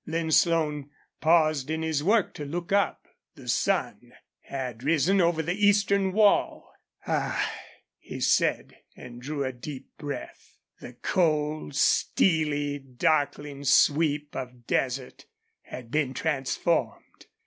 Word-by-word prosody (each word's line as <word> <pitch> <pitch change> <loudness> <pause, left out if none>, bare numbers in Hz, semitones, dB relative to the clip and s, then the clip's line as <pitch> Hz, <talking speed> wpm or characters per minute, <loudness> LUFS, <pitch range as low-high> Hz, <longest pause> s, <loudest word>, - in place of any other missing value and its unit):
Lin 160 0 -2
Slone 150 -4 +2 0.3
paused 155 -4 +2
in 160 0 -2
his 160 -2 -1
work 210 +3 +2
to 150 - -7
look 170 +5 -5
up. 200 0 +1 0.3
The - - -13
sun - - -1 0.3
had 125 -4 -6
risen 165 +6 +3
over 170 -2 +1
the 175 +3 -1
eastern 200 -1 +3
wall. 210 +1 +2 0.3
"Ah!" - - -1 0.5
he - - -8
said, - - +1 0.2
and 120 -1 -11
drew 145 +2 -3
a 130 -1 -3
deep 130 +2 -9
breath. 145 -1 -8 0.2
The 125 - -10
cold, 150 0 -1
steely, 145 -2 +1
darkling 145 +1 -1
sweep 150 +1 +2
of 125 -2 -7
desert 130 +1 -2 0.3
had 120 -2 -10
been 140 -4 0
transformed. 150 +3 -2
150 Hz, 120 wpm, -27 LUFS, 135-165 Hz, 0.5 s, risen